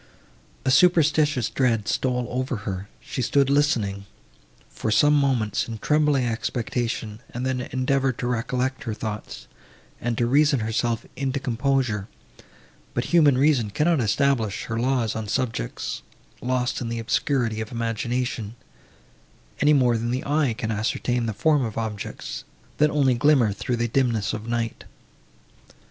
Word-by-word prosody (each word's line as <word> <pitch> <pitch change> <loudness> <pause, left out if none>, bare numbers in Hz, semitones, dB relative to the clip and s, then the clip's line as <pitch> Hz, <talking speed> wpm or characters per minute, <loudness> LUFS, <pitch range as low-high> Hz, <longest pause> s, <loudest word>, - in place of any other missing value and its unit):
A 130 - +3
superstitious 150 -4 +4
dread 115 -6 +1
stole 125 -1 0
over 130 +2 -1
her; 95 -2 -4
she 130 - -4
stood 140 +2 +2
listening, 105 -9 +1 0.6
for - - -4
some 145 +8 +5
moments, 130 -8 +1
in 115 -1 -5
trembling 150 +1 +2
expectation, 115 -1 -2
and 125 +1 -4
then 130 -1 -1
endeavoured 130 0 +1
to - - -3
recollect 125 +2 -1
her 110 -3 -3
thoughts, 105 - -6 0.5
and 120 -1 -1
to 120 - +2
reason 140 +1 +3
herself 115 +1 -1
into 135 +1 -1
composure; 125 -5 0 0.9
but - - +1
human 150 -6 +6
reason 135 -6 +3
cannot 155 - +2
establish 115 -2 +1
her 115 0 -3
laws 125 -3 0
on 110 -1 -4
subjects, 115 - -2 0.4
lost 125 0 -1
in 115 - -3
the 115 - -3
obscurity 115 -1 0
of 110 - -6
imagination, 115 -1 -2 1.0
any 150 +1 +5
more 125 -4 +3
than 115 +1 -2
the 125 +2 -2
eye 145 -4 +1
can 110 -2 -2
ascertain 115 +2 -1
the - - 0
form 145 +7 +2
of 110 -3 -4
objects, 105 - -5 0.3
that 150 0 +4
only 140 -4 +3
glimmer 120 -4 +3
through 120 +4 -2
the 120 0 0
dimness 115 -4 +1
of 110 +1 -5
night. 115 -1 -2
125 Hz, 145 wpm, -24 LUFS, 110-135 Hz, 1.0 s, human